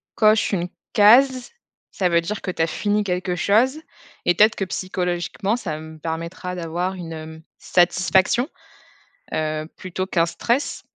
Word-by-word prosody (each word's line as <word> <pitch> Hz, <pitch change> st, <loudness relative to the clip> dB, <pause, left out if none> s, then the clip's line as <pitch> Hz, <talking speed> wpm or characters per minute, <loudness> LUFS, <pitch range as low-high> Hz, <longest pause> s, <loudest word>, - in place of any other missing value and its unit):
coches 215 Hz, -1 st, +4 dB
une 175 Hz, -2 st, 0 dB, 0.3 s
case, 250 Hz, +4 st, +5 dB, 0.4 s
ça 185 Hz, -2 st, 0 dB
veut 170 Hz, 0 st, +3 dB
dire 205 Hz, +5 st, -4 dB
que 185 Hz, -, -3 dB
tu 175 Hz, -, -4 dB
as 165 Hz, -, +3 dB
fini 205 Hz, +5 st, 0 dB
quelque 180 Hz, -1 st, -2 dB
chose», 225 Hz, -, +2 dB, 0.5 s
et 175 Hz, -, +4 dB
peut-être 215 Hz, +5 st, +5 dB
que 195 Hz, -, -2 dB
psychologiquement 185 Hz, +3 st, -2 dB
ça 160 Hz, -10 st, -4 dB
me 160 Hz, 0 st, -10 dB
permettra 170 Hz, +3 st, -5 dB
d'avoir 175 Hz, +2 st, -3 dB
une, 175 Hz, -3 st, -7 dB
hem, 160 Hz, 0 st, -9 dB, 0.2 s
satisfaction, 185 Hz, -, +2 dB, 0.8 s
heu, 155 Hz, 0 st, -2 dB
plutôt 185 Hz, 0 st, -4 dB
qu'un 170 Hz, -3 st, +2 dB
stress, 240 Hz, +10 st, -1 dB
180 Hz, 150 wpm, -22 LUFS, 170-210 Hz, 0.8 s, case